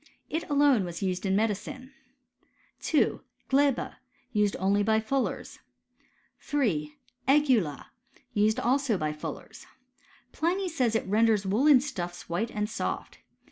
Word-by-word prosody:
It 320 - -3
alone 285 -6 +4
was 175 +2 -5
used 185 0 -1
in 190 - +2
medicine. 225 +5 -2 0.9
2. - - +1 0.3
Gleba 275 -1 +2 0.2
— 255 - -38
used 205 -1 +2
only 195 +2 +2
by 220 +1 +3
fullers. 260 +4 -2 0.8
3. 165 - -1 0.3
Egula 260 - +3 0.3
— 250 - -32
^used 215 +2 +3
also 255 -2 +1
by 155 -2 -2
fullers. 150 - -8 0.6
Pliny 365 +4 0
says, 250 -9 0
it - - 0
renders 215 0 +2
woollen 255 +7 +5
stuffs 175 -12 -5
white 190 +7 -1
and 210 -1 -2
soft. 220 - -4
220 Hz, 130 wpm, -28 LUFS, 195-270 Hz, 0.9 s, woollen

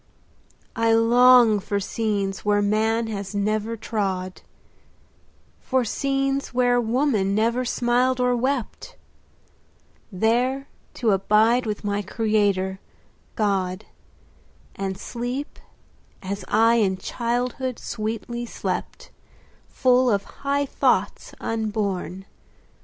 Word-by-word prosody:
I 230 -1 +2
long 235 -1 +6
for 200 +1 -2
scenes 200 -2 -2
where 205 0 +2
man 220 +2 +1
has 205 -2 -5
never 215 +2 -1
trod— 190 -4 -3 1.2
For 260 -2 0
scenes 275 +2 -1
where 245 -1 +3
woman 225 -5 +1
never 230 +4 +1
smiled 245 +2 +1
or 250 0 +2
wept— 260 - -3 1.2
There 245 +7 0 0.3
to 230 -3 +1
abide 220 +5 +3
with 210 0 -3
my 205 0 -1
Creator, 200 -2 0 0.6
God, 195 -2 -1 0.9
15 195 - -5
And 190 -1 -4
sleep 245 +6 -5 0.6
as 195 +1 -4
I 230 +1 +4
in 190 -4 +1
childhood 245 +4 -2
sweetly 230 +2 -4
slept, - - -5 0.6
Full 255 -1 +3
of 200 -3 +1
high 280 +4 -2
thoughts, - - 0
unborn. 205 -4 -3
225 Hz, 100 wpm, -23 LUFS, 205-245 Hz, 1.2 s, long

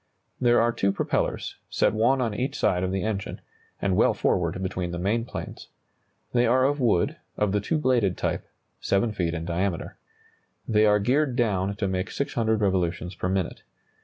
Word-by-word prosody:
There 120 -1 +4
are 120 +1 +3
two 100 -4 +1
propellers, - - -2
set - - +2
one 120 +5 +3
on 115 -4 0
each 125 +6 -2
side 90 -1 +2
of 95 - -1
the 95 -1 -1
engine, 105 -3 -3 0.4
and 95 -2 +1
well - - +3
forward 90 0 0
between 90 -1 -2
the 85 - -4
main 105 +6 0
planes. - - -7 0.7
They 120 0 +3
are 130 +2 +4
of 145 +2 +1
wood, 115 -9 +2 0.2
of 105 -2 +1
the 105 0 +1
two 155 +10 0
bladed 120 -10 +2
type, - - -2 0.3
7 100 +3 +1
feet 85 -5 -1
in 80 0 -4
diameter. 90 +1 -2 0.7
They 110 -1 +4
are 105 0 +5
geared 130 +5 +1
down 100 -5 0
to 100 -1 -1
make 95 0 -2
600 110 -5 -1
revolutions 90 -3 0
per 90 - -3
minute. 95 -2 -2
100 Hz, 180 wpm, -26 LUFS, 95-120 Hz, 0.7 s, are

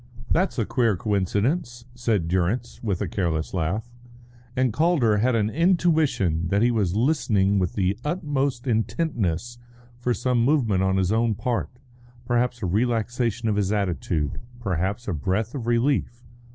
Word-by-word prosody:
"That's 185 -1 +1
a 115 - +1
queer 115 -6 +1
coincidence," 115 - -1
said 115 -8 0
Durrance, 95 +8 -1
with 100 -6 -2
a - - -2
careless 85 -3 -2
laugh; 95 +6 -1 0.7
and 130 -3 +1
Calder 145 -8 +3
had 120 +3 +2
an 110 -1 +1
intuition 155 - +2
that 100 +5 +2
he 120 - +4
was 100 -6 0
listening 105 -6 +2
with 90 -2 -1
the 95 -1 +1
utmost 145 -6 -1
intentness 120 - -1 0.4
for 125 0 0
some 125 -2 +1
movement 120 -9 +2
on 95 0 +2
his 95 0 +1
own 115 0 +2
part, 115 +2 -2 0.6
perhaps 120 0 0
a - - +1
relaxation 115 +3 0
of 105 -2 +1
his 100 -1 +1
attitude, 85 -7 -1 0.2
perhaps 100 +1 -2
a 100 - -1
breath 95 - -1
of 125 -5 -5
relief. 120 0 0
115 Hz, 150 wpm, -24 LUFS, 95-125 Hz, 0.7 s, he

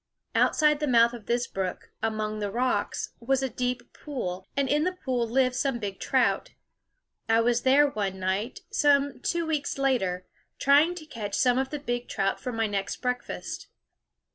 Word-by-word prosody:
Out - - +3
side 300 -1 +4
the 300 - -1
mouth 235 -2 +5
of 235 -3 -10
this 240 +1 +1
brook, 190 -1 -4
among 215 -1 -2
the 205 -1 -2
rocks, 235 -1 -1
was 265 +3 +1
a 265 - 0
deep 250 +1 -2
pool; 190 -11 -5
and 280 -1 +2
in 295 +3 +2
the 365 +2 0
pool 245 -3 0
lived 255 +1 +2
some 270 -1 0
big 200 -4 -5
trout. - - +1 0.7
I 225 0 +5
was 235 +1 +2
there 280 +3 +5
one 200 -7 -3
night, 195 - -2
some 285 -1 +3
two 340 -1 -1
weeks 305 -4 -1
later, 195 -10 0 0.3
trying 295 +6 +4
to 330 -3 -8
catch 220 -9 -5
some 250 0 +3
of 265 0 -1
the 295 - -3
big 245 -4 -3
trout 195 -2 0
for 250 - -4
my 225 -1 0 0.3
breakfast. 250 -1 -4
245 Hz, 175 wpm, -27 LUFS, 215-280 Hz, 0.7 s, mouth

